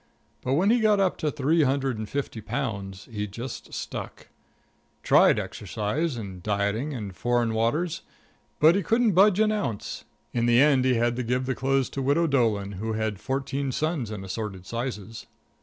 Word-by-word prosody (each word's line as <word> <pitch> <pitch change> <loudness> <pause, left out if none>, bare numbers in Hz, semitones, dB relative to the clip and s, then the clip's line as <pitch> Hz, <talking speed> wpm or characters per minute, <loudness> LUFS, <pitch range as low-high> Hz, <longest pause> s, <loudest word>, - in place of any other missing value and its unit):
But 130 - -1
when 185 +9 +3
he 240 - +4
got 215 -2 +3
up 190 -2 +2
to 155 - 0
three 150 +3 +2
hundred 135 -4 +1
and 110 -1 -5
fifty 140 -5 -3
pounds 105 -5 -4
he 105 -1 -3
just 120 +6 -7
stuck. - - -6 0.7
Tried - - +5
exercise 130 +7 -2
and 95 -5 -7
dieting 105 - -1
and 105 -8 -6
foreign 120 0 +1
waters, 145 +10 0 0.6
but 155 +2 +7
he 200 - +1
couldn't 230 +4 +2
budge 195 +2 +5
an 215 0 +4
ounce. 195 - -3 0.3
In 120 -1 +1
the 120 0 +5
end 135 -2 +5
he 130 -1 +3
had 120 +1 +1
to - - 0
give 125 +2 0
the 130 - 0
clothes 135 0 +1
to - - -4
the 135 - -2
Widow 160 +4 +3
Doolan, 115 -9 +1
who 110 +3 -4
had 110 -2 -2
fourteen 135 +1 -2
sons 155 -4 -1
in 105 -3 -6
assorted 95 -1 -5
sizes. 115 -2 -5
125 Hz, 180 wpm, -26 LUFS, 110-150 Hz, 0.7 s, but